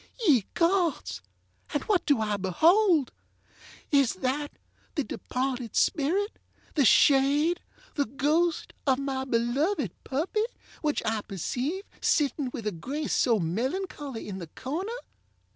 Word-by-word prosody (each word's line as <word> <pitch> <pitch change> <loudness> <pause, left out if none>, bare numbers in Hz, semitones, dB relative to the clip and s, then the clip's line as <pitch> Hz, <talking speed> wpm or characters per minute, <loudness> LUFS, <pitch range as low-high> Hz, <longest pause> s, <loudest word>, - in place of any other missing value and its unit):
Ye 250 - +5
gods! 335 - +1 0.5
and 290 - +1
what 400 -5 +1
do 285 -7 +3
I 210 -1 0
beholdŌĆöis 285 - +1
that 290 +3 -1 0.4
the 295 - +1
departed 250 0 -3
spirit, 355 +8 +1 0.3
the 285 -4 +3
shade, 290 +7 +4 0.3
the 285 - 0
ghost, 305 +7 0
of 265 -1 +4
my 270 -1 -2
beloved 255 - 0
puppy, 345 +11 0 0.4
which 300 -2 0
I 220 -1 0
perceive 250 - -3 0.2
sitting 285 -3 +1
with 230 -4 -6
a 210 - 0
grace 270 - -3
so 235 -4 +3
melancholy, 260 - -3
in 190 -2 -5
the 170 - -7
corner? 315 - -4
275 Hz, 120 wpm, -28 LUFS, 235-320 Hz, 0.5 s, Ye